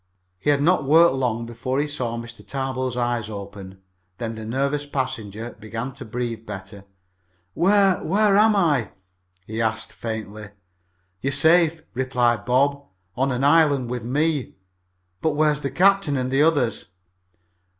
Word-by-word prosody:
He 145 - -1
had 145 -1 +3
not 180 +4 +3
worked 160 +3 +5
long 120 -3 -1
before 125 +3 -3
he 145 - +1
saw 125 -6 -3
Mr. 115 0 -9
Tarbill's 130 -2 -3
eyes 120 -3 -1
open. 100 -2 -9 0.4
Then 115 -1 -4
the 110 -1 -7
nervous 140 +5 -1
passenger 115 -5 -4
began 115 +4 -5
to 135 +1 -9
breathe 115 -1 -4
better. 100 0 -8 0.7
"Where 195 - +3
where 200 +3 +3
am 215 +1 +5
I?" 150 - +1 0.5
he 110 +2 -4
asked 110 0 -2
faintly. 110 -2 -6 0.7
"You're 135 - -1
safe," 160 +2 +3
replied 125 -3 0
Bob. 140 +3 +2 0.3
"On 135 +2 0
an 125 +1 -1
island 145 -4 +3
with 125 -1 -3
me. 145 +3 -1 0.7
But 160 - +1
where 150 +1 +3
is 150 0 -3
the 140 - -2
captain 195 -5 +3
and 130 0 -2
the 135 +2 +3
others?" 145 - +1
130 Hz, 150 wpm, -23 LUFS, 115-150 Hz, 0.7 s, worked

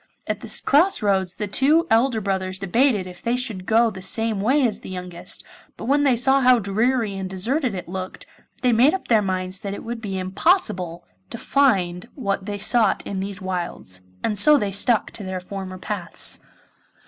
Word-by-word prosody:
At - - -3
the - - -3
cross 325 - +3
roads 190 -3 +1
the 210 - -3
two 295 - +3
elder 230 +1 +3
brothers 190 -1 -2
debated 205 +2 +1
if 180 -1 -11
they 235 +1 0
should 225 -7 -4
go 230 +1 +4
the 190 -2 -9
same 220 +2 -1
way 265 +6 +3
as 225 - 0
the - - -10
youngest, 180 -2 -4 0.3
but - - -7
when 280 +4 +2
they 275 -4 +3
saw 265 +3 +4
how 255 -1 +6
dreary 220 +1 0
and 190 -1 -4
deserted 230 - 0
it 180 - -6
looked 185 +1 -6 0.4
they 250 - +4
made 250 +9 +4
up 380 - -7
their 225 -3 +5
minds 185 -1 -2
that 200 0 -5
it - - -9
would 235 0 -5
be 195 -3 -4
impossible 185 - 0 0.2
to - - -7
find 190 -11 +1
what 200 -6 -2
they 205 -1 -3
sought 215 0 +2
in 195 - -4
these 195 0 -4
wilds, 175 - -4 0.2
and 210 -3 +2
so 300 +6 +7
they 205 -6 -1
stuck 220 +3 +2
to 210 - -8
their 190 -1 -4
former 185 0 -7
paths. 185 -3 -3
205 Hz, 195 wpm, -22 LUFS, 185-245 Hz, 0.4 s, so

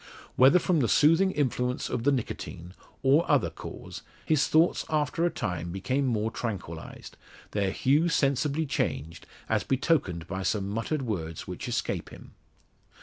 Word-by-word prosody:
Whether 135 +7 +7
from 180 -2 +2
the 120 - +2
soothing 165 +9 +4
influence 125 -6 -1
of 120 0 -3
the 145 - +5
nicotine, 90 -8 -4 0.3
or 140 +5 +5
other - - +3
cause, - - -9 0.2
his 155 -3 +2
thoughts 160 +2 +3
after 155 +2 +1
a - - +1
time 90 - -4
became 130 +9 -1
more 110 -2 0
tranquillised 95 -10 -6 0.3
their 100 -2 0
hue 145 - +2
sensibly 145 +1 +1
changed, 80 - -3 0.2
as - - +1
betokened 130 - 0
by 95 +2 -4
some 100 0 -1
muttered 115 +8 -2
words 85 -9 -4
which - - -6
escape - - -2
him. - - -13
130 Hz, 145 wpm, -28 LUFS, 95-150 Hz, 0.3 s, Whether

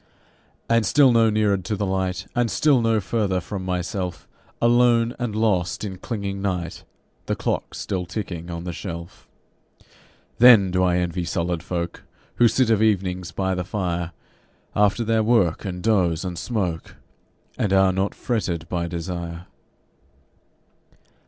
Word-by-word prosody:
And 115 -1 +3
still 135 +5 +5
no 115 -1 +4
neared 105 -3 +1
to 110 - -1
the 100 0 -2
Light, 95 -1 -2
And 120 -1 +2
still 145 -2 +3
no 115 -1 +2
further 100 -2 0
from 95 +2 -6
myself, 90 -1 -3 0.3
Alone 120 0 +4
and 120 -4 -2
lost 100 -6 0
in 95 -3 -5
clinging 100 -2 -4
night 90 -4 -3 0.4
(The - - 0
clock's - - -3
still 90 -2 -3
ticking 90 -4 -5
on 85 0 -5
the 90 -1 -4
shelf). 85 0 -8 1.1
Then 115 -6 +7
do 90 0 +1
I 90 -1 +3
envy 90 0 -1
solid 85 0 -2
folk 85 0 -4 0.4
Who 120 - +6
sit 115 +1 +2
of 110 -1 +3
evenings 90 -5 0
by 95 +2 -1
the 90 -1 -2
fire, 90 -3 -2 0.6
After 105 +3 +3
their 115 0 +2
work 110 -6 +2
and 90 -2 -5
doze 95 -6 +2
and 90 -1 -4
smoke, 90 -3 -3 0.6
And 105 - -1
are 95 -1 +4
not 95 +2 -1
fretted 90 -9 -2
by 85 -1 -1
desire. 85 0 -5
95 Hz, 145 wpm, -23 LUFS, 90-110 Hz, 1.1 s, Then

